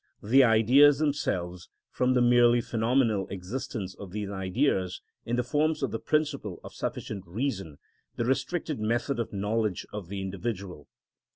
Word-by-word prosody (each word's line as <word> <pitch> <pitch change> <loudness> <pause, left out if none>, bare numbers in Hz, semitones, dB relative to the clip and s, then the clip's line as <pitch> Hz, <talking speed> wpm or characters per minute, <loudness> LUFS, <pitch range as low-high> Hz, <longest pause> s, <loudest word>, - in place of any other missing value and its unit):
_, - - -9
the 135 +4 +6
Ideas 125 +5 +6
themselves, 90 - -2 0.2
from 130 0 +1
the 125 - +4
merely 120 0 +5
phenomenal 115 -3 +1
existence 100 +1 -5
of 100 -1 -10
these 100 +1 -4
Ideas 95 -1 0 0.3
in 120 - 0
the 125 - +1
forms 150 +4 0
of 135 - 0
the 115 - -3
principle 145 - -1
of - - -10
sufficient 100 -3 -4
reason, 95 - -3 0.4
the 120 - -1
restricted 150 +2 -1
method 120 +5 -1
of 115 - -3
knowledge 105 -1 -1
of 105 -4 -6
the 100 +2 -5
individual. 95 -4 -5
115 Hz, 155 wpm, -28 LUFS, 95-130 Hz, 0.4 s, the